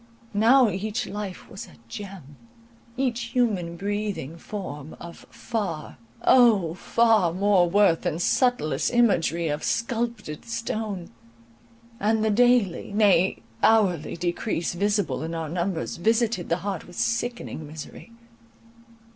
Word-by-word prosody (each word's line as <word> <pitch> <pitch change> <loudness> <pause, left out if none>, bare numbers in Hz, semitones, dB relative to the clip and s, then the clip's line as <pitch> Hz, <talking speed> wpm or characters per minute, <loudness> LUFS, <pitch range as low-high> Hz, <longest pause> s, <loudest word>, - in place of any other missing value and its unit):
Now 235 +5 +5
each 215 +5 -3
life 205 -3 -6
was 195 - -9
a - - -16
gem, 185 - -9 0.6
each 240 -3 -1
human 190 -9 0
breathing 200 -6 -3
form 160 -6 -7
of 170 0 -11
far, 190 - -4 0.2
O! 215 -10 +5
far 220 -1 +3
more 185 -1 +3
worth 195 -3 +4
than 155 - -2
subtlest 170 - +1
imagery 175 -8 +2
of 150 0 -2
sculptured 230 - -2
stone; 215 -5 -4 0.9
and 220 +1 +1
the 220 - +2
daily, 240 -5 +3
nay, 195 -4 +3 0.2
hourly 185 -9 +3
decrease 175 +1 -2
visible 205 +2 0
in 165 +1 -4
our 160 -2 -4
numbers, 175 0 -2
visited 225 -1 +1
the 170 - +2
heart 195 -5 -3
with 175 - -13
sickening 235 -9 -2
misery. 160 +9 -10
200 Hz, 120 wpm, -25 LUFS, 170-225 Hz, 0.9 s, Now